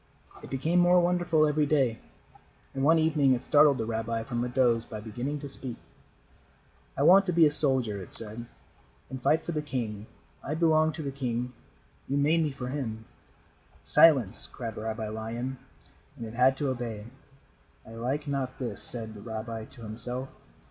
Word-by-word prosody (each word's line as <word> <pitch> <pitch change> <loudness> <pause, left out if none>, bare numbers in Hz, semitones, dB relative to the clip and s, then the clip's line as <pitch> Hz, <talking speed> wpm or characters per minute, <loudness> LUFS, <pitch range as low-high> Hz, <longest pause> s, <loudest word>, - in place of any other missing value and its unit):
It - - -11
became 155 +7 0
more 175 +1 +5
wonderful 175 -3 +2
every 150 0 +1
day, 135 -6 +1 0.7
and 135 - -3
one 160 +3 +5
evening 150 -4 +3
it 120 - -6
startled 145 -2 +4
the 115 - -3
rabbi 115 0 -3
from 120 +1 -3
a 125 - -3
doze 120 -2 +2
by 110 -2 -8
beginning 120 +7 -5
to 145 - -6
speak. 130 -3 -8 1.2
"I 140 - +1
want 190 +5 +6
to - - +1
be 165 -1 +5
a 150 - +3
soldier," 130 -9 0
it 90 - -11
said, 115 +2 +7 0.6
"and 130 -1 -6
fight 160 +5 +2
for - - -3
the 155 -2 -2
king. 115 -7 -5 0.4
I 150 - -3
belong 160 -1 +3
to 160 - -6
the 140 - -4
king. 125 -2 -3 0.6
You 140 - 0
made 155 +4 +2
me 155 - 0
for 125 -2 -6
him." 115 -5 -5 0.8
"Silence," 130 - +4
cried 115 -3 -6
Rabbi 110 0 -4
Lion, 115 +4 -5 0.6
and 115 - -6
it 110 - -9
had 130 +2 +3
to 140 -1 -1
obey. 115 -5 -5 0.8
"I - - -12
like 130 +6 -3
not 135 -2 -3
this," 125 -3 -5
said 110 -3 -4
the 105 - -11
rabbi 110 0 -6
to 115 - -15
himself. 125 +4 -6
130 Hz, 175 wpm, -28 LUFS, 115-150 Hz, 1.2 s, said